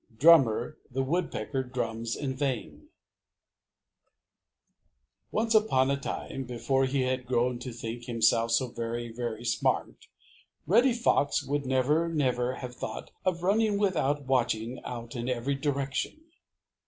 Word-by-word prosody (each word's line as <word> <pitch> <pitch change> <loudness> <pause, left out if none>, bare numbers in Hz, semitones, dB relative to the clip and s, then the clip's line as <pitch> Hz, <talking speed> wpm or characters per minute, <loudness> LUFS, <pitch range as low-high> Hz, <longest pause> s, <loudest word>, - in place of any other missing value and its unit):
Drummer 140 -2 +5
the 135 +1 -1
Woodpecker 135 -4 -1
Drums 115 -3 -3
in 135 -2 -3
Vain 125 - -3 2.4
Once 225 +1 0
upon 140 -12 +4
a - - +2
time, 140 -1 -5
before 135 +2 0
he 135 +1 0
had 130 -1 -1
grown 125 0 +1
to 125 +1 -6
think 115 0 -6
himself 115 -1 +2
so 120 +2 +2
very, 120 0 -4
very 120 -1 -4
smart, 120 - -1 0.6
Reddy 235 - +4
Fox 190 -12 +2
would 140 0 -2
never, 145 +6 +2
never 130 -5 0
have 125 -1 -7
thought - - -6
of 175 -2 0
running 210 +2 +2
without 150 -8 +1
watching 120 -2 0
out 120 -1 -7
in 120 +1 -3
every 125 +2 -1
direction. 140 - -2
130 Hz, 130 wpm, -29 LUFS, 120-145 Hz, 2.4 s, Drummer